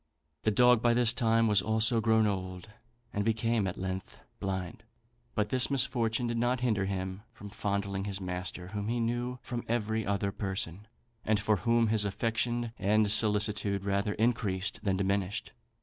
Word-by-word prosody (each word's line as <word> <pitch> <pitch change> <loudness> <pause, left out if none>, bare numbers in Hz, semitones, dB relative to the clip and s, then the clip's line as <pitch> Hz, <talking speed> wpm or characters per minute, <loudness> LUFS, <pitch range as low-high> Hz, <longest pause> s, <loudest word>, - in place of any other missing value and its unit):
The 110 - +1
dog 125 +1 +5
by 120 -1 +3
this 120 -1 +4
time 115 -2 +2
was 105 -3 +4
also 110 +1 +2
grown 110 0 +3
old, 95 0 -4 0.4
and 100 - 0
became 115 -1 +1
at 95 - -4
length 95 0 -5 0.2
blind; 95 -3 -4 0.5
but 105 -1 0
this 130 +1 +2
misfortune 120 -3 +1
did 120 -1 -1
not 125 +1 0
hinder 110 -6 +1
him 95 0 -4
from 100 -1 -11
fondling 100 -1 -2
his 100 -1 -3
master, 90 -1 -5
whom 105 0 -4
he 120 +1 -1
knew 120 +2 -2
from 120 -1 -4
every 110 -1 -1
other 100 0 -1
person, 95 -1 -4 0.4
and 110 -1 +1
for 105 0 +1
whom 115 +2 +2
his 110 -1 +4
affection 115 +3 -1
and 105 +1 +3
solicitude 105 -2 +3
rather 100 +1 0
increased 105 -4 0
than 95 -3 0
diminished. 100 0 -1
105 Hz, 165 wpm, -30 LUFS, 100-115 Hz, 0.5 s, dog